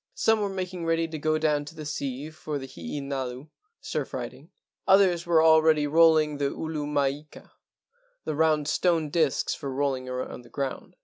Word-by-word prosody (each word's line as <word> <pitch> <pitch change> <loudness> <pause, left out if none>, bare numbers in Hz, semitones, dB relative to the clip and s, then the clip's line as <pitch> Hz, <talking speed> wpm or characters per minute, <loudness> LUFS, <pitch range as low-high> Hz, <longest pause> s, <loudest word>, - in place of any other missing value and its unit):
Some 220 0 +3
were 200 - 0
making 185 -2 -4
ready 165 0 +1
to 160 -1 -6
go 155 +1 +1
down 150 -2 +1
to 155 - -11
the 155 - -7
sea 140 0 -4
for 155 -2 -5
the 135 - -6
hee 85 - -6
nalu 135 0 -5 0.3
(surf - - -4
riding). - - -7 0.4
Others 190 -3 +4
were 170 -1 +3
al¬ 160 0 +6
ready 155 -2 +3
rolling 155 -1 +4
the 140 -1 +1
ulu 155 -1 -4
maika 145 +1 -3 0.7
(the - - -2
round 155 -1 +2
stone 160 -2 +1
discs 155 -5 +1
for 140 - -6
rolling 130 -1 -1
along 125 0 -5
the 120 - -17
ground). 135 -2 -5
150 Hz, 180 wpm, -26 LUFS, 140-160 Hz, 0.7 s, al¬